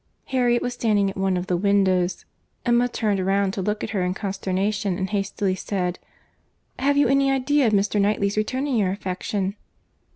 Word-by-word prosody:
Harriet 245 -2 +1
was 245 - -2
standing 210 -5 +1
at - - -13
one 190 -1 0
of 180 - -3
the 180 - 0
windows. 190 -1 +1 0.4
Emma 240 0 +3
turned 205 -5 0
round 195 0 +1
to 195 - -3
look 210 +3 -2
at - - -4
her 200 -4 -1
in 180 +1 -1
consternation, 195 0 -1
and 190 0 -3
hastily 200 -1 -1
said, 180 -2 -3 0.8
"Have 280 +2 +2
you 285 -2 +4
any 275 +1 +3
idea 270 0 +2
of 215 - +1
Mr. 205 +1 +2
Knightley's 200 0 +1
returning 255 +5 -1
your 200 -4 +2
affection?" 195 +1 -3
200 Hz, 175 wpm, -23 LUFS, 190-240 Hz, 0.8 s, you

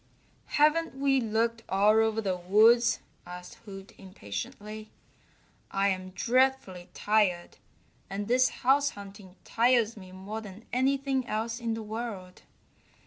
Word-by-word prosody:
"Haven't 310 +1 +3
we 270 -1 +2
looked 230 +1 0
all 205 +3 +4
over 220 0 +1
the 190 -3 -1
woods?" 220 +7 +4 0.2
asked 180 0 -10
Hoot 195 -2 -10
impatiently. 195 - -7 0.8
"I'm 190 -1 0
dreadfully 245 -7 +1
tired, 205 -5 +1 0.5
and 200 +1 -4
this 255 +2 +3 0.2
house 280 +2 +4
hunting 195 -2 -11
tires 235 -1 +2
me 185 -3 -12
more 195 +4 -7
than 210 +1 -11
anything 265 0 0
else 225 +2 -3
in 230 -1 -2
the 225 - -6
world. 210 -4 -6
215 Hz, 120 wpm, -28 LUFS, 195-240 Hz, 0.8 s, all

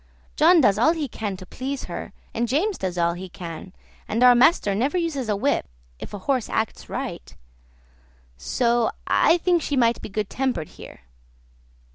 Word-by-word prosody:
John 335 +2 +6
does 205 -5 +3
all 315 +8 +4
he 315 -4 -3
can 210 -5 -5
to 185 - -10
please 265 +7 -5
her, - - -6 0.2
and 235 +1 -1
James 345 - 0
does 180 -2 -3
all 170 0 +2
he 185 +2 -8
can, 175 0 -8 0.4
and 230 +3 0
our 250 0 +9
master 245 - +4
never 260 - 0
uses 295 -9 -2
a 210 - +2
whip 275 +8 0 0.3
if - - -8
a 205 - -5
horse 260 -5 0
acts 220 -1 -2
right; - - -6 1.0
so 235 - +1 0.2
I 335 - +4
think 350 -1 +2
she 285 -2 -2
might 235 -1 +2
be - - -7
good 210 0 -2
tempered 250 - -2
here. - - -13
240 Hz, 175 wpm, -23 LUFS, 195-285 Hz, 1.0 s, our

